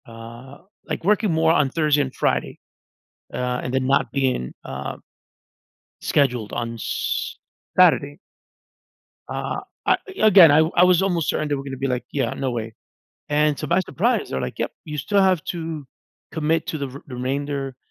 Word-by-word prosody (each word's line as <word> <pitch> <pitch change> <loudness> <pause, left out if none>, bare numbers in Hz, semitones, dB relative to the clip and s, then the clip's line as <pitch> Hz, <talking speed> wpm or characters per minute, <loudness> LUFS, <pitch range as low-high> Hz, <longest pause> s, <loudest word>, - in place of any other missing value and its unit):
Uh, 115 +3 -11 0.3
like - - -4
working 210 +1 +2
more 160 0 +3
on 145 -4 +3
Thursday 150 0 +2
and 135 -2 -3
Friday, - - -1 0.7
uh, 125 0 -2
and 125 - -4
then 130 -1 +1
not 135 +1 +2
being, 130 - -1
uh 65 +1 -5 1.1
scheduled 125 -7 +1
on 115 0 -3
S 115 - -3 0.4
Saturday. 155 -5 +4 1.1
Uh, - - -3 0.3
I - - +4 0.2
again, 190 -7 +8
I 145 - +5
w 160 +1 +3
I 175 - +6
was 180 -1 +5
almost 175 -5 0
certain 155 - 0
they 145 - 0
were 135 - -5
going 135 - -7
to 135 - -5
be 135 +1 -1
like, 125 -1 -2
yeah, 135 -5 -1
no 130 -2 -2
way. 115 -2 -4 0.6
And 150 0 +2
so 150 - -4
by 185 - +3
surprise, 220 +6 0
they're 65 - -2
like, 65 - -5
yep - - -2
you 150 -1 -6
still 200 +8 +2
have 185 -4 +3
to 165 -5 -5 0.5
commit 160 0 0
to 155 - -2
the 140 -1 -3
re 135 +2 -10
remainder 135 +1 -3
145 Hz, 175 wpm, -22 LUFS, 130-165 Hz, 1.1 s, again